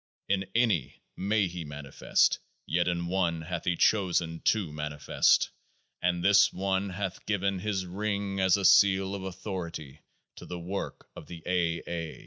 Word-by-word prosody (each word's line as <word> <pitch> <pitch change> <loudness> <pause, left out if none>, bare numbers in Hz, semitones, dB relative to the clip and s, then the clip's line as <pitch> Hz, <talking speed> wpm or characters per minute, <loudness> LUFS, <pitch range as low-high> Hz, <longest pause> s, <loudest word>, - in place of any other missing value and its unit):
In 95 0 +1
any 110 - +1
may 100 +2 +1
he 90 -1 -6
manifest; 75 -2 0 0.3
yet 85 +1 +1
in 85 -1 -1
one 85 -2 0
hath 85 +1 -5
he 90 - +1
chosen 85 -5 +2
to 100 -8 +2
manifest; 75 -2 +2 0.5
and 90 -1 0
this 100 0 +6
one 95 +1 -1
hath 95 0 -4
given 100 -2 0
His 100 -1 -2
ring 100 +1 -2
as 95 +1 +4
a 100 - -1
Seal 95 0 +5
of 100 - -4
Authority 90 -6 -6 0.4
to - - -10
the 90 - -5
Work 90 +3 -5
of - - -10
the 85 -2 -9
A.'. 85 -2 0
A.' 85 -2 -5
90 Hz, 155 wpm, -29 LUFS, 85-100 Hz, 0.5 s, this